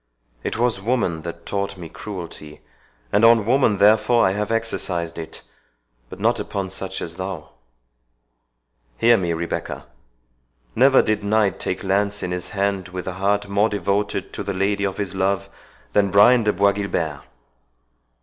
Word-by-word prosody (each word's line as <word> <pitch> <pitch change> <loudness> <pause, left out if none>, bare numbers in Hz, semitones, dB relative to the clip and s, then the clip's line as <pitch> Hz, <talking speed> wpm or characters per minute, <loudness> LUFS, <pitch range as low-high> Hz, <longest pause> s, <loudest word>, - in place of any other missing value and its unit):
It - - -3
was 115 -4 +1
woman 105 -8 0
that 85 +1 -8
taught 100 -1 -3
me 85 -2 -8
cruelty, 85 -5 -8 0.5
and 105 - +3
on 115 -2 +6
woman 120 -3 +3
therefore 110 +4 +4
I 95 - +3
have 105 +1 -2
exercised 95 -7 -2
it; 80 0 -8 0.7
but - - -10
not - - +2
upon 95 -2 -4
such 95 0 -5
as 85 0 -6
thou. 95 -5 -6 1.5
Hear 120 +1 +5
me, 90 -5 -1
Rebecca—Never - - -2
did 105 -1 -1
knight 105 -1 +1
take 95 - -3
lance 100 +1 0
in 90 - -3
his 90 -1 -4
hand 100 -2 -1
with 90 0 -6
a 95 - -4
heart 100 +2 0
more 100 +2 +2
devoted 100 0 -2
to - - -5
the 100 -1 -3
lady 100 +1 0
of 95 - -6
his 100 -2 -3
love 100 +1 0 0.4
than 100 -1 +3
Brian 110 +4 +5
de 105 - +3
Bois 100 0 +3
Guilbert. 90 -7 -3
100 Hz, 155 wpm, -22 LUFS, 90-105 Hz, 1.5 s, on